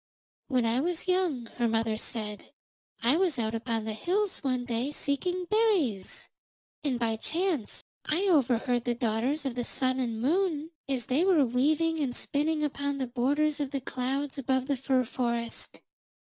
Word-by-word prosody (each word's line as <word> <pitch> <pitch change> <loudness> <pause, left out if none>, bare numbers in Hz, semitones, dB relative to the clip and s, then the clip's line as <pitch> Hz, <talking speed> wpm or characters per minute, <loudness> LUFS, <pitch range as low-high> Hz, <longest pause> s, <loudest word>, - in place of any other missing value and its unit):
'When 255 -4 +2
I 230 +2 +2
was 340 +4 -1
young,' 360 -10 +1
her 240 -1 +2
mother 225 -1 +1
said, 215 -2 -5 0.5
'I 250 +7 +5
was 350 -6 +2
out 220 -1 -1
upon 225 -1 -2
the 220 - -2
hills 370 - 0
one 255 -2 0
day 245 +3 -1
seeking 355 +6 -1
berries. 360 - +1 0.6
And 275 -4 0
by 225 -2 0
chance 330 - -1 0.2
I 325 +5 +1
overheard 250 - +2
the 240 -1 +1
daughters 240 +6 0
of 265 - -1
the 245 0 -2
Sun 255 +1 0
and 230 -3 -1
Moon 320 - +1 0.2
as 255 -4 -1
they 275 +7 +2
were 355 -7 +5
weaving 305 +7 +2
and 260 -5 -1
spinning 300 +2 0
upon 285 -1 -1
the 265 - -1
borders 285 +5 +1
of 285 -2 -1
the 275 - -2
clouds 270 +2 -2
above 260 0 +1
the 280 - 0
fir 260 0 +1
forest. 235 -1 -3
265 Hz, 165 wpm, -29 LUFS, 240-310 Hz, 0.6 s, I